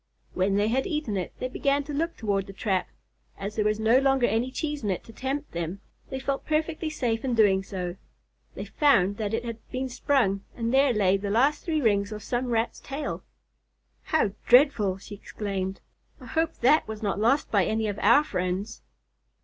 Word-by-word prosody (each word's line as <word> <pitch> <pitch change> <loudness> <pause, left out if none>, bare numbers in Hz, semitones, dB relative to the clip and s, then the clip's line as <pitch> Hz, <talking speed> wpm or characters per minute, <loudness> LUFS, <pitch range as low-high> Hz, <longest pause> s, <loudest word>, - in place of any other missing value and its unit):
When 195 +2 +1
they 205 +2 +2
had 260 +3 0
eaten 300 - -2
it, 185 -2 -3
they 255 - -3
began 280 +2 0
to 290 +1 -7
look 330 +4 -2
toward 200 -4 -1
the 195 - -9
trap. 190 -2 -1 0.5
As 205 +2 -5
there 215 - +1
was 210 0 +1
no 225 +4 +4
longer 270 -2 +3
any 235 +2 0
cheese 295 0 -4
in 205 - -1
it 185 - -2
to 225 - -14
tempt 275 +4 -3
them, 170 +3 -4 0.3
they 265 - -4
felt 275 +1 -2
perfectly 315 +1 -1
safe 235 -7 -1
in 255 -3 0
doing 200 -4 +4
so. 180 -2 -5 0.6
They - - -5
found 200 -10 +3
that 215 0 -1
it 235 +1 -3
had 230 -1 -5
been 260 +1 -3
sprung, 240 -6 +1
and 230 +1 -2
there 270 0 +5
lay 195 -4 +3
the 200 +1 -4
last 260 +8 +2
three 315 -3 0
rings 205 -3 +2
of 210 -1 -6
some 250 +1 -2
Rat's 230 -1 -1
tail. 285 +1 -5 0.8
"How 310 -10 +1 0.2
dreadful!" 240 -7 +5
she 200 - -11
exclaimed. 195 -2 -4 0.4
"I - - -12
hope 325 0 -1
that 300 +6 +4
was 220 0 -6
not 200 -1 -1
lost 240 +7 +2
by 200 -4 +3
any 220 0 0
of 205 0 -3
our 235 +8 +5
friends." 185 -3 -3
225 Hz, 200 wpm, -26 LUFS, 200-270 Hz, 0.8 s, there